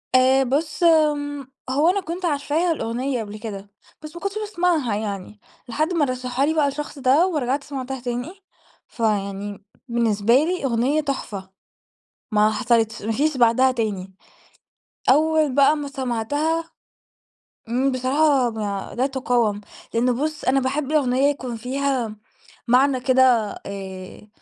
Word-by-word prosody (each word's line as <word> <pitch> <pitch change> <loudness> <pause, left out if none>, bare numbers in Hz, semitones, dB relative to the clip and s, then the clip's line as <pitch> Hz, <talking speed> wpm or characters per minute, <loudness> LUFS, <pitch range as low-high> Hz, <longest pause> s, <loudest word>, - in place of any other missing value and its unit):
آآ، 260 +1 +5
بُصّ، 305 +7 -1
امم، 290 -4 +2 0.2
هو 290 +6 +3
أنا 395 +2 +1
كنت 355 +2 -5
عارفاها 310 +2 0
الأغنية 245 -1 -2
قبل 210 0 -8
كده، 205 -3 -7 0.3
بس 305 +1 -10
ما 345 - -8
كنتش 395 +1 -3
باسمعها 345 - 0
يعني، 205 -1 -5 0.3
لحد 310 +9 -1
ما 315 -4 +2
رشحها 255 +1 -1
لي 315 - +1
بقى 300 -3 +2
الشخص 290 0 -5
ده 275 +8 +4
ورجعت 280 -4 -1
سمعتها 265 -2 -5
تاني. 245 +6 -4 0.5
فيعني 205 -2 -2 0.2
بالنسبة 230 -2 +1
لي 325 +3 +1
أغنية 260 +5 +1
تُحفة، 210 -9 -4 0.8
ما 215 0 +4
حصلتش، 225 -1 +1
ما 220 - -2
فيش 285 +4 0
بعدها 245 +2 +4
تاني. 205 -6 -3 1.0
أول 310 0 +3
بقى 280 +2 +5
ما 290 -1 -4
سمعتها 290 +6 -2 1.0
امم، 260 +3 +1
بصراحة 260 0 +2 0.4
لا 255 +2 +1
تقاوم، 245 -6 0 0.3
لأنه 245 +2 +2
بُصّ، 310 -1 -4
أنا 270 +1 +3
باحب 270 +2 -2
الأغنية 275 -2 +3
يكون 255 -4 -5
فيها 255 -2 -2 0.5
معنى 260 +2 +4
كده 255 +1 +3 0.4
آآ، 190 0 -8
260 Hz, 135 wpm, -22 LUFS, 230-295 Hz, 1.0 s, آآ